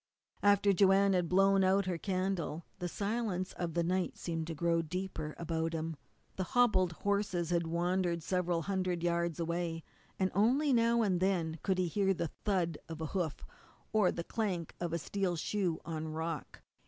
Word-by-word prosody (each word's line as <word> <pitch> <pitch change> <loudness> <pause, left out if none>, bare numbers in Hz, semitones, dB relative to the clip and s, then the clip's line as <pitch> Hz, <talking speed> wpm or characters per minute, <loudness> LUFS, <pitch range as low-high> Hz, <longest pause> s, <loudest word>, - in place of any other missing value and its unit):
After 205 0 +5
Joanne 195 +1 +5
had 175 -3 +1
blown 195 +1 +4
out 190 +1 +3
her 180 -2 -2
candle 185 -4 -2
the 180 - -2
silence 200 -1 -2
of 170 -2 -4
the 170 - +2
night 180 +1 -1
seemed 165 -2 -3
to 165 - -4
grow 170 +1 +2
deeper 165 -2 -4
about 165 -1 -2
him. 160 0 -3 0.4
The 190 - 0
hobbled 195 -8 +4
horses 195 -3 -1
had 170 -1 +1
wandered 175 0 0
several 180 -2 0
hundred 185 -3 -1
yards 170 -1 0
away, 170 -1 -2 0.3
and 185 -1 +1
only 260 +9 +3
now 235 0 +4
and 185 -4 +1
then 170 -4 0
could 190 -2 0
he 180 -1 +1
hear 195 +2 +1
the 165 -3 -3
thud 175 -6 +1
of 160 -1 -6
a 160 - -2
hoof, 175 -6 -2 0.5
or 210 -4 +4
the 170 - -4
clank 185 -6 -2
of 175 -1 -2
a 170 - 0
steel 185 +2 -1
shoe 175 0 -1
on 160 -1 -4
rock. 160 0 -5
180 Hz, 175 wpm, -33 LUFS, 165-195 Hz, 0.5 s, After